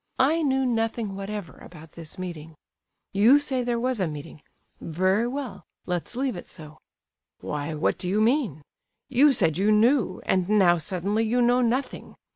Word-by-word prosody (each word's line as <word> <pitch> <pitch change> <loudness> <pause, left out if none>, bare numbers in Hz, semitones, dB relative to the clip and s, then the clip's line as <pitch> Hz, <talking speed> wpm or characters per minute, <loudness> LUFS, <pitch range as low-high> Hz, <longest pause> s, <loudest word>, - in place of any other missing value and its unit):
I 305 +6 +3
knew 265 -3 +1
nothing 225 -3 -1
whatever 200 -2 -6
about 160 -2 -13
this 165 +1 -10
meeting. 165 -4 -7 0.6
You 220 +8 +6
say 280 -3 -1
there 240 -1 -1
was 250 -1 -1
a 185 - +1
meeting. 150 -1 -8 0.4
Very 185 +7 0
well; 250 -6 -5 0.2
let's 180 +5 -4
leave 260 -2 -1
it 175 - -9
so—" 155 -2 -12 0.6
"Why, 150 +1 -4
what 150 - 0
do 180 - -2
you 205 +3 +1
mean? 220 - +1 0.5
You 275 +3 +5
said 170 - +1
you 205 +2 +3
knew, 220 -2 +3
and 185 0 +1
now 185 -5 +4
suddenly 195 +6 -1
you 230 +3 0
know 245 +1 +3
nothing! 250 +3 -2
210 Hz, 165 wpm, -25 LUFS, 175-245 Hz, 0.6 s, You